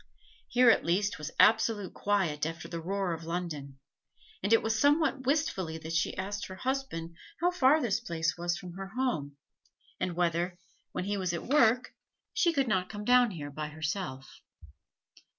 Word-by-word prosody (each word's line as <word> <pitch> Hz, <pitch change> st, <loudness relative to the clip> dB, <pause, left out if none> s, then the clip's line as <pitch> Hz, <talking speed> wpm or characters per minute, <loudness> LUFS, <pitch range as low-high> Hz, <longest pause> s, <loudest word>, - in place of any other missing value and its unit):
Here 250 Hz, -1 st, +6 dB
at -, -, +2 dB
least 195 Hz, +3 st, 0 dB
was 150 Hz, +1 st, -4 dB
absolute 220 Hz, -3 st, +4 dB
quiet 185 Hz, -8 st, 0 dB
after 165 Hz, +2 st, -3 dB
the 170 Hz, -1 st, -5 dB
roar 190 Hz, +1 st, -1 dB
of 165 Hz, 0 st, -6 dB
London; 160 Hz, -5 st, -4 dB, 0.6 s
and 205 Hz, -, -1 dB
it 225 Hz, -, +5 dB
was 225 Hz, 0 st, 0 dB
somewhat 285 Hz, -2 st, +2 dB
wistfully 195 Hz, -, 0 dB
that 160 Hz, 0 st, -6 dB
she 165 Hz, -, 0 dB
asked 200 Hz, +2 st, -3 dB
her 185 Hz, -, -8 dB
husband 255 Hz, -10 st, -3 dB, 0.2 s
how 350 Hz, +2 st, +2 dB
far 300 Hz, -3 st, +4 dB
this 225 Hz, -7 st, 0 dB
place 165 Hz, -7 st, -1 dB
was 175 Hz, 0 st, -1 dB
from 180 Hz, -1 st, -9 dB
her 195 Hz, +1 st, -6 dB
home, 155 Hz, -, -1 dB, 0.6 s
and 180 Hz, -2 st, -2 dB
whether, 175 Hz, +1 st, 0 dB, 0.3 s
when -, -, -3 dB
he 205 Hz, +2 st, -1 dB
was 185 Hz, -3 st, -1 dB
at 170 Hz, -, -4 dB
work, 250 Hz, -2 st, +3 dB, 0.4 s
she 410 Hz, -7 st, +3 dB
could 275 Hz, -5 st, +1 dB
not 185 Hz, -4 st, 0 dB
come 210 Hz, -1 st, -6 dB
down 245 Hz, 0 st, +5 dB
here 150 Hz, -7 st, -6 dB
by 150 Hz, +1 st, -4 dB
herself. 155 Hz, -3 st, -4 dB
190 Hz, 170 wpm, -30 LUFS, 165-240 Hz, 0.6 s, Here